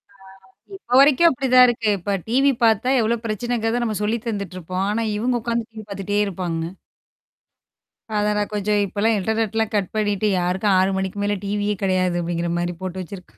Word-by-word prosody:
ஆ. - - -25 0.6
இப்ப 250 -9 -1
வரைக்கும் 295 +4 +6
அப்படிதான் 255 -2 +5
இருக்கு. 225 -3 0
இப்ப 200 +3 -2
டிவி 270 +4 +3
பாத்தா 225 +3 +3
எவ்ளோ 225 +2 +1
பிரச்சனைங்கிறத 230 +2 -1
நம்ம 215 -3 -2
சொல்லி 220 +3 0
தந்துட்டுருப்போம். 185 -3 -3
ஆனா 225 +2 -1
இவங்க 240 +2 0
உட்காந்து 235 -1 -2
டிவி 220 -1 -10
பாத்துட்டே 200 +1 -2
இருப்பாங்க. 175 -3 -3 1.5
அதான் 210 0 +1
நான் 205 0 -2
கொஞ்சம் 210 0 +1
இப்பலாம் 210 +3 0
இன்டர்நெட்லாம் 220 +1 -1
கட் 200 -3 0
பண்ணிட்டு 210 -1 0
யாருக்கும் 190 +3 +1
6 190 +1 +3
மணிக்கு 190 +1 -3
மேல 205 0 0
டிவியே 205 +1 -1
கிடையாது 185 -2 +1
அப்படிங்கிற 170 0 -2
மாரி 175 0 -2
போட்டு 185 0 -4
வச்சிருக்கு 180 0 -11
210 Hz, 160 wpm, -22 LUFS, 190-225 Hz, 1.5 s, வரைக்கும்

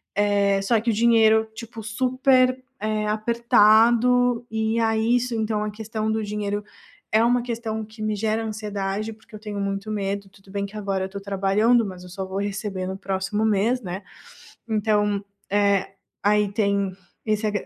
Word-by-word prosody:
eh, 200 -1 +2
só 225 +2 +3
que 235 - +1
o - - 0
dinheiro, 220 -1 +4
tipo, 230 -1 -8
super, 255 +3 +2 0.2
eh, 215 0 -1
apertado, 235 +2 +4
e 220 +1 0
aí 225 +1 +2
isso 245 0 -2
então 215 -1 -1
a 210 - -3
questão 220 0 -3
do 220 0 -1
dinheiro 205 0 -3 0.5
é 220 +1 +4
uma 245 +1 +3
questão 225 -2 -3
que 220 +1 -13
me 215 -1 0
gera 220 +2 -1
ansiedade, 210 0 -3
porque 220 0 -23
eu - - -8
tenho 210 -1 -5
muito 195 +1 -3
medo. 200 -1 -3
Tudo 195 0 -19
bem 200 0 -2
que 205 +2 -9
agora 195 -2 -2
eu - - -4
estou 200 +1 -8
trabalhando, 200 +4 +2
mas 185 -2 -8
eu 180 - -11
só 190 +1 -5
vou 190 +1 -5
receber 200 -2 -3
no 190 - -4
próximo 195 +2 -2
mês, 220 +4 +2
né. 190 0 -6 0.7
Então, 210 -2 +1 0.3
eh, 200 -1 +2 0.4
aí 210 0 +3
tem 200 -2 +1 0.3
esse 215 0 0
a - - 0
215 Hz, 175 wpm, -24 LUFS, 200-225 Hz, 0.7 s, dinheiro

